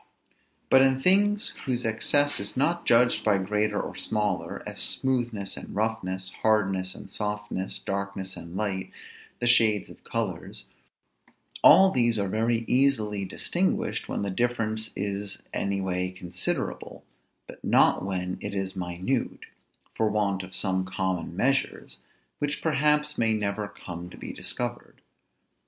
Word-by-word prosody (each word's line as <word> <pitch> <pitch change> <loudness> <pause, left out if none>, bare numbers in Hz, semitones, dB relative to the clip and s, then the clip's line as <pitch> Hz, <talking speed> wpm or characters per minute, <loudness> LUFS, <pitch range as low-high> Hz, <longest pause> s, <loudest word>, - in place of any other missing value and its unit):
But 130 - +7
in 135 0 +4
things 205 +6 +4 0.2
whose 125 -2 -1
excess 145 +6 +3
is 100 +3 -1
not 170 +6 0
judged 120 +1 +4
by 105 -2 +3
greater 105 +3 0
or - - -5
smaller, 105 -3 -1
as - - -4
smoothness 120 -6 +1
and - - -9
roughness, 95 -4 -2
hardness 95 -4 +1
and - - -10
softness, 105 -2 -3
darkness 100 -1 -4
and 85 +1 -9
light, 95 -3 -2 0.5
the - - -1
shades 110 -4 +4
of - - -16
colors, - - -4 1.0
all 190 +5 +8
these 120 -5 +3
are 100 -1 0
very 115 +3 0
easily 110 -7 +2
distinguished 175 - -1
when - - -2
the 100 - -2
difference 110 -1 -1
is 100 0 -3
any 100 0 -1
way 90 -1 -1
considerable, 90 -1 -3 0.4
but - - -13
not - - +4
when 90 -1 -3
it - - -4
is 95 -1 -3
minute, 90 +8 -2 0.5
for 110 - +1
want 100 -2 0
of 95 0 -8
some 95 -2 +1
common 95 -2 -3
measures, 135 +5 0 0.4
which 145 0 -2
perhaps 150 0 +2
may 115 -1 +3
never 105 0 -2
come 90 -3 -8
to - - -13
be - - -7
discovered. 120 0 -4
105 Hz, 140 wpm, -27 LUFS, 95-120 Hz, 1.0 s, all